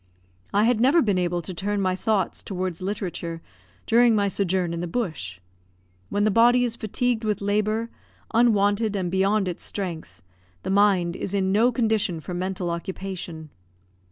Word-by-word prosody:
I 205 +1 +3
had 230 -1 +2
never 275 +7 +5
been 200 -4 +1
able 175 -1 -1
to 185 - -6
turn 205 +4 -2
my 185 -1 +1
thoughts 200 -1 0
towards 185 -3 -4
literature 180 -4 -4 0.5
during 235 0 +5
my 200 -1 +2
sojourn 185 -3 0
in 170 - -3
the 175 - -3
bush. 155 - -3 0.7
When 205 - 0
the 215 - +3
body 240 +3 +5
is 235 -2 0
fatigued 235 +1 -1
with 210 -2 0
labour, 215 +3 0 0.4
unwonted 215 -2 +3
and 180 -3 -2
beyond 195 +1 +2
its 175 - -5
strength, 165 - -5 0.4
the - - -2
mind 195 -4 +3
is 200 - -3
in 190 -1 +1
no 225 +5 +4
condition 220 -7 +1
for 180 - -7
mental 180 0 -2
occupation. 170 -3 -6
195 Hz, 160 wpm, -24 LUFS, 180-215 Hz, 0.7 s, never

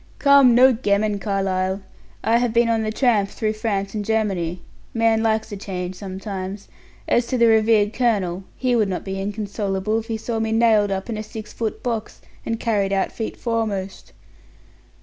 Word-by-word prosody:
"Come, 280 -4 +6
no 260 +2 +7
gammon, 210 -2 0
Carlyle. 195 -2 -1 0.4
I 230 +1 +3
have 240 -2 0
been 235 0 +3
on 225 -1 +2
the 215 0 -1
tramp 220 -5 +2
through 215 -1 -2
France 200 -3 -2
and 210 -1 -2
Germany. 195 -6 -1 0.4
Man 225 -1 +3
likes 220 0 0
a - - -4
change 185 -2 -5
sometimes. 190 +1 -6 0.4
As 240 0 +2
to 255 - -1
the 235 - +5
revered 220 -1 +4
colonel, 195 -7 0
he 255 -1 +1
would 215 -4 +2
not 185 - -4
be 195 0 -4
inconsolable 205 0 -2
if 225 - -9
he 225 -2 -2
saw 225 +1 -3
me 220 0 -1
nailed 220 -3 +4
up 195 -1 -3
in 220 - -3
a - - -3
six 215 0 -9
foot 225 -2 -4
box, 230 -3 -3 0.3
and 230 0 -2
carried 205 -5 0
out 195 -1 0
feet 225 - -5
foremost." 215 -5 -3
215 Hz, 180 wpm, -22 LUFS, 195-230 Hz, 0.4 s, no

